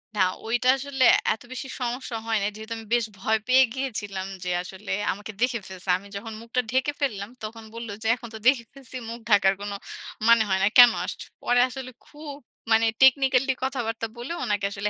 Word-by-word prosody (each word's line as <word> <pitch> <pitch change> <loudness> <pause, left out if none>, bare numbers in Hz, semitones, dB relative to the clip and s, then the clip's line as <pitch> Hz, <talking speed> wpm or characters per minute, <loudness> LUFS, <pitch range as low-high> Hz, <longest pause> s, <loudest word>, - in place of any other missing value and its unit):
না, - - -3 0.3
ঐটা 240 +3 +1
আসলে 270 0 -1 0.3
এত 220 - -11
বেশি 260 +1 -5
সমস্যা 245 -1 -3
হয় 225 -1 +1
নাই, 200 - 0
যেহেতু 220 +1 -7
আমি 225 - -9
বেশ 240 -2 +3
ভয় 220 +3 +2
পেয়ে 260 +1 +6
গিয়েছিলাম 205 -8 -4 0.2
যে 180 - -3
আসলে 190 +3 -8 0.2
আমাকে 205 +3 -7
দেখে 250 -2 +2
ফেলছে। 190 0 -9
আমি 200 - -14
যখন 220 +2 -6
মুখটা 235 +2 -1
ঢেকে 260 +3 +1
ফেললাম 210 -8 -2
তখন 225 +1 -7
বলল 230 0 -7
যে, - - -1
"এখন 240 -1 -10
তো - - -6
দেখে 260 -3 +5
ফেলছি 270 -2 -12
মুখ 235 - -6
ঢাকার 200 -2 +5
কোন 205 0 -4 0.6
মানে 235 -1 +7
হয় 190 0 +2
না। - - +5
কেন 245 -1 +10
আসছ?" - - -6 0.2
পরে 245 0 +3
আসলে 255 0 -7
খুব 295 -1 -9 0.4
মানে 225 +1 +5 0.2
technically 265 0 +4
কথাবার্তা 235 -4 -2
বলে 240 +6 -6
ওনাকে 205 -1 0
আসলে 200 +1 -2
235 Hz, 195 wpm, -25 LUFS, 210-260 Hz, 0.6 s, কেন